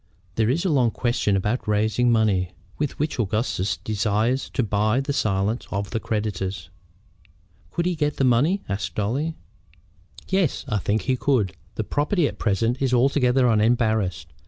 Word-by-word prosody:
"There 110 +2 +1
is 165 +9 0
a - - +2
long 130 -6 +3
question 120 -4 0
about 105 +5 -1
raising 110 +3 +2
money 100 -5 +2 0.3
with 145 -1 -2
which 150 -2 -2
Augustus 105 -5 0
desires 110 +6 0
to 130 - +2
buy 110 +3 +1
the 140 +1 -2
silence 105 -1 0
of 100 +1 -3
the 115 - -1
creditors." 95 -6 -3 1.0
"Could 170 - -2
he 180 - +1
get 150 -3 -1
the - - +1
money?" 135 +11 +3
asked 95 -4 -3
Dolly. 135 +10 -1 0.9
"Yes, 190 -6 0
I 105 - 0
think 105 +2 0
he 130 - +1
could. 125 -8 +1 0.2
The - - -1
property 150 +3 +1
at - - -7
present 115 +4 0
is 130 -2 +2
altogether 125 0 +3
unembarrassed. 110 - +1
115 Hz, 155 wpm, -24 LUFS, 105-135 Hz, 1.0 s, long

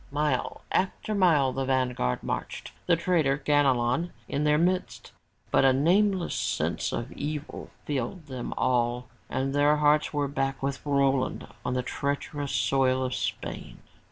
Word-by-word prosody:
Mile 145 -2 -1
after 195 +3 0
mile 160 -10 +3
the 135 - -1
vanguard 125 - 0
marched, - - -4 0.2
the 175 - +5
traitor 160 -5 +1
Ganelon 140 +1 +2 0.2
in 145 +2 -1
their 150 0 +4
midst, 180 +3 -1 0.4
but - - +4
a 135 -1 +6
nameless 185 +6 +2
sense - - -1
of 120 +2 -4
evil 150 +1 -5 0.2
filled 145 +4 -3
them 130 -4 -6
all 125 -1 +1 0.2
and 135 +1 -1
their 145 +1 +4
hearts 150 0 +3
were 145 -1 0
back 135 -1 -2
with 135 -1 -2
Roland 135 -2 +1 0.2
on 125 - -1
the 125 - 0
treacherous 140 +2 -3
soil 130 +4 +2
of 130 0 -2
Spain. - - -4
140 Hz, 145 wpm, -27 LUFS, 130-150 Hz, 0.4 s, a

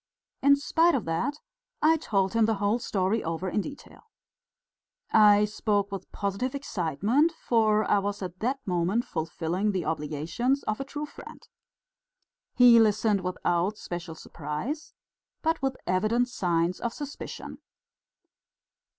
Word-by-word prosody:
In 280 0 +6
spite 325 +3 +2
of 250 - -2
that 165 - -1 0.4
I 315 +1 +5
told 195 -10 0
him 230 -1 +4
the 220 0 +1
whole 205 +3 +1
story 200 0 0
over 165 +3 -3
in 205 - 0
detail. 285 +6 -11 1.0
I 210 -1 +6
spoke 205 -1 -1
with 195 -2 -7
positive 200 +7 -2
excitement, 220 - +1
for 220 -7 +2
I 205 - +3
was 205 0 -3
at 185 0 -7
that 265 +4 -2
moment 180 +6 0
fulfilling 165 +5 -2
the 185 - -2
obligations 160 - -1
of 215 - -2
a - - -2
true 295 +2 -5
friend. - - -13 1.1
He 245 -2 +8
listened 210 -2 +3
without 180 +2 -1
special 175 -4 -6
surprise, 160 - -6 0.5
but 325 +1 +1
with 270 -1 -1
evident 215 +7 +1
signs 175 -5 0
of 235 -1 -3
suspicion. 290 -1 -7
210 Hz, 135 wpm, -27 LUFS, 180-245 Hz, 1.1 s, He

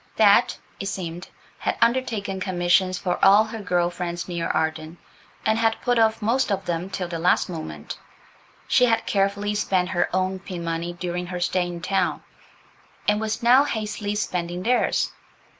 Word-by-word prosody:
Bet, 205 -2 +5 0.2
it 195 - -4
seemed, 175 -2 -5 0.3
had - - -1
undertaken 230 -5 0
commissions 185 0 +2
for 180 -1 -2
all 200 +2 +7
her 220 +1 -7
girl 175 -3 +1
friends 175 -1 -4
near 170 -2 -2
Arden, 160 +1 -2 0.5
and 220 +1 +2
had 225 -1 +1
put 245 -1 +2
off 225 0 +2
most 235 +1 +1
of 195 -1 -1
them 175 +2 -2
till 185 -2 -3
the 170 -1 -4
last 180 +2 +2
moment; 80 - -7 0.7
She 250 - +4
had 225 -2 +1
carefully 200 +1 0
spent 185 -3 0
her 180 -3 0
own 185 +1 0
pin 180 -2 -7
money 165 +1 -3
during 175 0 -4
her 180 0 -4
stay 175 0 0
in 175 -1 -6
town, 185 0 0 0.8
and 210 +1 +2
was 220 +2 -3
now 250 +4 +6
hastily 215 -5 -3
spending 180 -3 -2
theirs. 250 +3 +1
185 Hz, 165 wpm, -24 LUFS, 175-215 Hz, 0.8 s, all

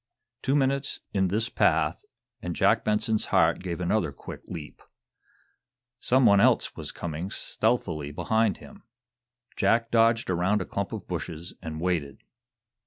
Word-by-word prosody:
Two 135 +1 +1
minutes 140 0 +1
in 95 -1 +2
this 110 +5 0
path, - - +1 0.4
and - - -4
Jack - - +3
Benson's 105 +1 0
heart - - +3
gave 90 -2 -4
another 90 -2 0
quick 70 - -9
leap. 80 -4 -8 1.2
Some 130 0 +3
one 100 -2 +6
else - - +3
was - - -6
coming 85 +2 -5
stealthily 100 -10 -1
behind 100 +6 +1
him. - - -14 0.7
Jack 115 0 +2
dodged 115 -2 +3
around 90 +4 +2
a 95 - -3
clump 100 0 -3
of 105 -5 -6
bushes 85 0 -5
and 80 -3 -6
waited. 80 -6 -2
100 Hz, 140 wpm, -27 LUFS, 85-115 Hz, 1.2 s, one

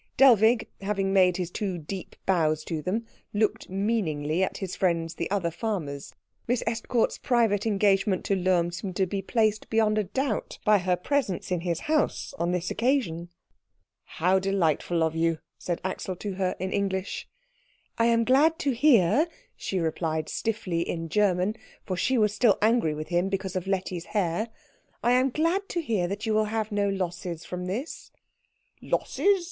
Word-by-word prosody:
Dellwig, 230 -3 +6
having 195 -1 -1
made 185 -2 +4
his 180 -2 -3
two 190 -3 -2
deep 175 +4 -7
bows 155 -4 +2
to 160 -1 -3
them, 210 +8 -2 0.3
looked 210 0 0
meaningly 185 -6 0
at - - -2
his 190 -2 -4
friends 165 -3 0
the 170 - -4
other 185 -4 0
farmers; 165 -7 -4 0.4
Miss 245 0 +1
Estcourt's 230 +1 0
private 225 -4 +2
engagement 195 -2 +2
to 200 - +2
Lohm 180 -2 +2
seemed 180 +1 -5
to 190 - +2
be 195 +2 -3
placed 215 +1 0
beyond 215 -1 +2
a - - +1
doubt 260 +3 -2
by 210 -1 +5
her 180 0 +1
presence 200 -2 -1
in 180 -2 0
his 170 -2 -2
house 305 -2 0
on 170 +1 +1
this 180 0 -1
occasion. 215 -10 0 0.9
"How 185 +4 +3
delightful 175 -3 +1
of 160 0 0
you," 165 0 +1 0.2
said 175 -2 -2
Axel 185 0 -3
to 200 +2 -5
her 185 -1 -1
in 190 +1 -3
English. 195 -1 -2 0.7
"I 230 - +4
am 230 0 +3
glad 290 +7 +4
to 290 -6 0
hear," 260 - +4 0.3
she 190 - -3
replied 160 -2 -1
stiffly 195 -6 -2
in 165 -1 -3
German, 200 +2 +2 0.3
for 185 - -2
she 260 +8 +1
was 210 -2 +3
still 215 -1 +4
angry 215 -8 +2
with 155 +1 -6
him 175 +2 +1
because 195 -1 -3
of 185 0 -2
Letty's 185 -3 -2
hair, 180 +3 0 0.6
"I 240 - +3
am 255 +2 +4
glad 335 +9 0
to 345 - -1
hear 220 - 0
that 200 +4 -4
you 220 - +1
will 215 0 +3
have 215 0 -2
no 205 -1 +1
losses 175 -3 -3
from 180 0 -5
this." 235 - -5 0.7
"Losses!" 400 -1 +1
195 Hz, 170 wpm, -27 LUFS, 175-225 Hz, 0.9 s, Dellwig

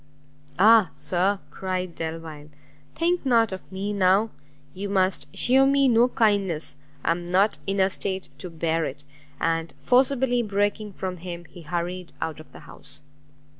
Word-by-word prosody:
"Ah, 215 -1 +6
Sir," 190 +3 +1
cried 185 -2 -3
Delvile, 160 -2 -6 0.5
"think 350 +2 +1
not 230 -5 +3
of 190 0 -8
me 195 +2 -3
now! 200 +3 +3 0.4
you 200 +2 -5
must 190 -1 +1
shew 265 +5 +5
me 275 0 +4
no 240 0 +5
kindness; 200 - +1 0.3
I - - +3
am 175 +1 -3
not 195 +4 +2
in 195 0 0
a 190 - +5
state 190 0 -3
to 180 - -6
bear 165 0 -1
it!" 145 0 -5 0.4
And, 165 0 -1
forcibly 255 -1 +2
breaking 205 0 -1
from 185 -1 -4
him, 175 0 -7
he 175 - -13
hurried 175 +2 -4
out 160 -1 -4
of 155 - -14
the - - -13
house. - - -8
190 Hz, 155 wpm, -25 LUFS, 170-220 Hz, 0.5 s, Ah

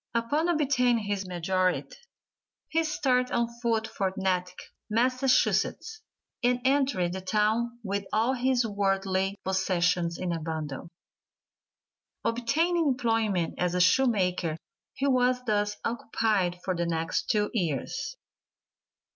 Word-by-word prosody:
Upon 290 +9 +1
obtaining 250 -8 +2
his 200 -2 -2
majority 185 +1 0 0.8
he 325 +1 +1
started 260 -5 +1
on 235 0 +1
foot 225 -2 +1
for 195 -3 -2
Natick, 180 -1 -1 0.3
Massachusetts, 255 - +1 0.4
and 245 0 +3
entered 265 -11 +2
the 190 - -4
town 215 +5 0
with 200 -1 -2
all 225 +4 +2
his 255 -1 +1
worldly 195 -1 0
possessions 180 -2 +1
in 180 -2 -2
a 165 - -2
bundle. 155 -2 -5 1.4
Obtaining 315 +9 +1
employment 225 -9 +1
as 180 0 0
a - - +1
shoemaker 185 -5 +2 0.4
he 275 - -2
was 250 -2 +2
thus 210 -2 0
occupied 215 -6 0
for 185 - 0
the 170 0 -1
next 165 0 -1
two 210 -1 +1
years. 215 - -2
210 Hz, 115 wpm, -28 LUFS, 185-250 Hz, 1.4 s, and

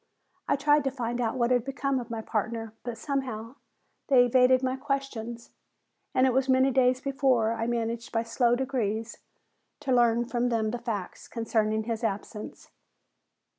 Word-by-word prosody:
I - - +3
tried 295 +1 +3
to - - +3
find 245 -2 -3
out 230 +1 -1
what 240 0 +1
had 245 -2 +3
become 275 0 -1
of 240 -1 -7
my 225 -1 -4
partner, 225 +1 -3
but 240 -2 -5
somehow 260 -3 -4 0.5
they 255 -3 +6
evaded 255 +1 +4
my 260 0 0
questions 265 -4 -4 0.6
and 255 - +5
it 260 - +3
was 265 +1 +1
many 260 +1 +4
days 255 0 +3
before 265 -5 +1
I 230 0 -2
managed 235 0 -2
by 225 0 0
slow 235 +1 +2
degrees 235 -4 -2 0.6
to 275 -3 -2
learn 240 -1 +3
from 245 0 0
them 220 -2 0
the 240 - -3
facts 215 -6 -5
concerning 220 -1 0
his 230 +1 -3
absence. 210 0 -5
240 Hz, 165 wpm, -28 LUFS, 225-260 Hz, 0.6 s, they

